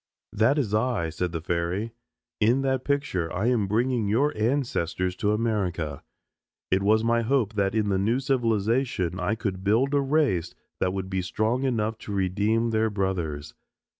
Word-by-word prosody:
"That 110 +7 +3
is 115 -8 -1
I," 110 -6 +1
said 90 +2 -2
the 80 -2 -4
fairy. 90 +6 -1 0.5
"In 120 +5 +3
that 130 -1 0
picture 140 -13 -1
I 95 - -1
am 115 -6 +1
bringing 115 +1 +1
your 135 +9 +2
ancestors 105 - -1
to 105 - +1
America. 95 - -1 0.7
It 95 - +3
was 110 +2 +3
my 115 0 +2
hope 115 -2 +1
that 100 0 0
in 105 -2 +1
the 95 -1 +1
new 115 +6 +1
civilization 115 - 0
I 105 - 0
could 95 -4 -4
build 115 +8 +2
a 140 - +3
race 135 - +1 0.2
that 90 - +1
would 95 0 -4
be 95 0 0
strong 110 +8 -1
enough 110 -3 -1
to - - -8
redeem 105 +4 +1
their 110 0 +2
brothers. 90 -8 -2
110 Hz, 165 wpm, -26 LUFS, 95-120 Hz, 0.7 s, That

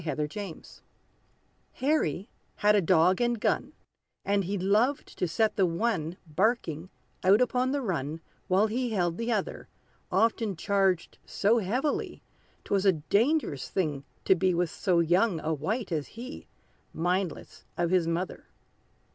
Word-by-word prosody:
=The 165 - -10
Young 150 0 -1 0.4
Sportsman= - - -17 0.9
Harry 255 - 0 0.3
had 210 0 +3
a 205 - +4
dog 180 +3 +3
and 240 -1 +1
gun; - - 0 0.5
And 200 -1 +1
he 200 +3 -2
loved 215 +9 +1
to 180 - +1
set 215 +7 0
the 190 -2 +4
one, 175 -2 -1
Barking, 175 -1 -1 0.3
out 195 +3 +6
upon 250 +1 +1
the 280 -1 -1
run, 160 - -2 0.3
While 190 +3 +3
he 240 +3 -1
held 175 -6 -1
the 230 +1 -1
other, 210 -4 -2 0.4
Often 225 -2 +1
charged 190 0 0
so 220 +4 +2
heavily, 250 +9 -2 0.4
'Twas 200 0 +1
a 190 - +6
dangerous 200 - 0
thing 150 -7 -1 0.2
to - - +6
be 185 0 +1
With 175 -1 0
so 180 -4 +1
young 175 +2 +2
a 160 - -1
wight 190 - -3
as 155 -3 -2
he 250 +6 -9 0.5
Mindless 180 +1 -2
of 175 0 0
his 180 -3 +3
mother. 170 +2 -3
190 Hz, 145 wpm, -28 LUFS, 170-225 Hz, 0.9 s, out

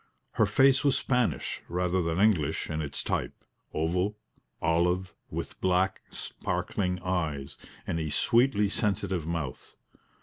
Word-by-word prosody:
Her - - +3
face 135 0 +5
was 140 -2 +4
Spanish 125 -3 0
rather 90 +1 +1
than 85 +1 -1
English 85 -8 +2
in 75 +1 -1
its 70 -2 -3
type - - -1 0.4
oval, 90 +6 0 0.4
olive, 90 +2 +1 0.2
with - - -5
black, 95 +1 +2
sparkling 90 -2 -2
eyes, 80 -7 -2 0.3
and 85 - -1
a 80 -1 -2
sweetly 120 - +3
sensitive 95 -5 -1
mouth. 80 -6 -4
90 Hz, 125 wpm, -29 LUFS, 80-100 Hz, 0.4 s, face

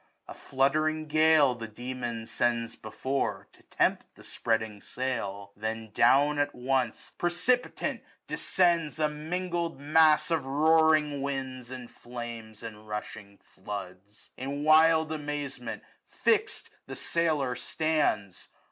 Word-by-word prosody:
A - - -8
fluttering 155 +4 0
gale, 155 -3 +4
the 115 -2 -7
demon 120 0 -5
sends 115 -1 -1
before^ 130 +5 -3
To - - -23
tempt - - 0
the - - -16
spreading 110 -2 -2
sail. 100 -6 -4
Then 110 +1 -4
down 145 +6 +4
at 145 - 0
once. 125 -1 -1
Precipitant, 180 +9 0 0.2
descends 170 -4 +1
a 155 - +3
mingled 170 +1 -3
mass 155 +2 +4
995 165 - +3
Of 135 - -12
roaring 155 0 +3
winds, 130 -3 -4
and 125 -2 -8
flame, 120 -2 -8
and 110 -1 -9
rushing 105 -1 -7
floods. 100 0 -9
In 140 +3 -4
wild 160 +1 +5
amazement 145 -5 -4 0.2
fix'd - - 0 0.2
the - - -6
sailor 155 -6 0
stands. 150 - -1
135 Hz, 120 wpm, -29 LUFS, 115-155 Hz, 0.2 s, wild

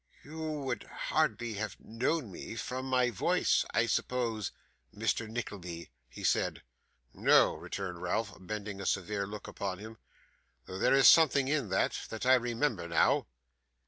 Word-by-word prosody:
'You 155 +3 -9 0.2
would 130 -5 -2
hardly 115 +1 -1
have 105 -1 -4
known 120 +2 -2
me 105 - -7
from 125 +5 -4
my 125 -1 +2
voice, 100 - +2
I - - +2
suppose, 115 -4 -1 0.4
Mr. 115 - -1
Nickleby?' 90 - -6 0.2
he - - -10
said. - - +1 0.5
'No,' - - +5
returned 90 -3 -6
Ralph, 100 +3 -1
bending 100 +1 -5
a 95 - -3
severe 100 +1 -1
look 105 +1 -8
upon 95 -2 -4
him. 110 +2 -10 0.7
'Though 95 - -7
there - - +4
is 135 -1 +7
something 140 -4 +6
in 140 -7 0
that, 95 - +1
that 110 +2 -5
I 130 - +6
remember 120 -4 +1
now. 85 -1 +3
110 Hz, 145 wpm, -31 LUFS, 95-125 Hz, 0.7 s, is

